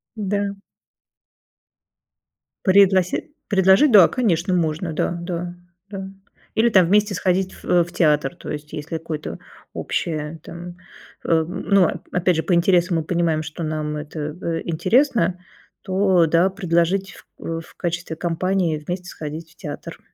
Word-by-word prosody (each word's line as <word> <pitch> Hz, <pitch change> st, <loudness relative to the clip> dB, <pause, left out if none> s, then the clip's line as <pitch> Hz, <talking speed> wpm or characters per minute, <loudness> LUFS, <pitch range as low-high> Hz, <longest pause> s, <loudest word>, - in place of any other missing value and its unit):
Да. 200 Hz, -1 st, -2 dB, 2.1 s
Предлоси 190 Hz, -, +4 dB, 0.2 s
предложить? 190 Hz, +7 st, +5 dB
Да, 195 Hz, -6 st, +9 dB
конечно, 190 Hz, -7 st, 0 dB
можно, 165 Hz, 0 st, -1 dB
да 155 Hz, -, -1 dB
да 175 Hz, 0 st, -4 dB, 0.4 s
да. 195 Hz, -1 st, -6 dB, 0.5 s
Или 230 Hz, +2 st, +4 dB
там 190 Hz, -6 st, +5 dB
вместе 205 Hz, +1 st, +3 dB
сходить 190 Hz, 0 st, 0 dB
в 175 Hz, -1 st, +2 dB
в 175 Hz, -, -13 dB
театр. 150 Hz, -2 st, +2 dB
То -, -, -8 dB
есть 150 Hz, 0 st, -7 dB
если 160 Hz, +2 st, -4 dB
какое-то 160 Hz, -1 st, -5 dB, 0.4 s
общее 155 Hz, -1 st, -3 dB
там. 175 Hz, +1 st, -9 dB, 0.5 s
Ам, 165 Hz, +1 st, 0 dB
ну, 195 Hz, -4 st, +5 dB, 0.2 s
опять 180 Hz, -1 st, +2 dB
же 160 Hz, -, 0 dB
по 185 Hz, -, 0 dB
интересам 175 Hz, 0 st, +3 dB
мы 160 Hz, -, -1 dB
понимаем, 165 Hz, -1 st, 0 dB
что 155 Hz, +2 st, -8 dB
нам 155 Hz, -1 st, -2 dB
это 150 Hz, 0 st, -5 dB
в 165 Hz, -1 st, -3 dB
интересно, 185 Hz, -, +2 dB, 0.4 s
то 190 Hz, -2 st, +3 dB
да, 170 Hz, +4 st, +3 dB
предложить 190 Hz, 0 st, 0 dB
ф -, -, -16 dB
в 165 Hz, 0 st, -6 dB
качестве 170 Hz, -1 st, -3 dB
компании 175 Hz, 0 st, 0 dB
вместе 180 Hz, 0 st, -4 dB
сходить 160 Hz, -1 st, -7 dB
в -, -, -37 dB
театр. 145 Hz, -2 st, -7 dB
175 Hz, 135 wpm, -22 LUFS, 160-190 Hz, 2.1 s, Да